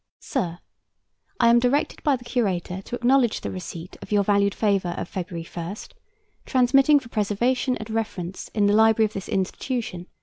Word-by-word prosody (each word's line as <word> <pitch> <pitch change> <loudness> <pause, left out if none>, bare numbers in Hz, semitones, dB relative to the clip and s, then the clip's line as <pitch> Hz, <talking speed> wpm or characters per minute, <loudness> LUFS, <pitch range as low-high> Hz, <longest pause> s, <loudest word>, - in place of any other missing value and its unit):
SIR, 175 -11 -3 0.8
I 235 - +5
am 235 0 +6
directed 250 +4 0
by 290 -2 +3
the 245 - -9
Curator 190 -7 -1
to 235 - -6
acknowledge 245 -1 +2
the - - -4
receipt 180 -1 -8
of - - -11
your 205 -1 +3
valued 200 0 +2
favor 195 -5 +1
of - - -4
February 170 -3 -5
1, 175 +3 -4 0.7
transmitting 270 +3 +5
for 250 -4 -14
preservation 240 +5 0
and 220 - -7
reference 195 -5 -4
in 210 -2 +3
the 205 - +3
library 220 +1 +5
of 215 - -4
this 195 - -6
institution 195 +1 -2
1. 180 - -11
210 Hz, 175 wpm, -24 LUFS, 185-245 Hz, 0.8 s, am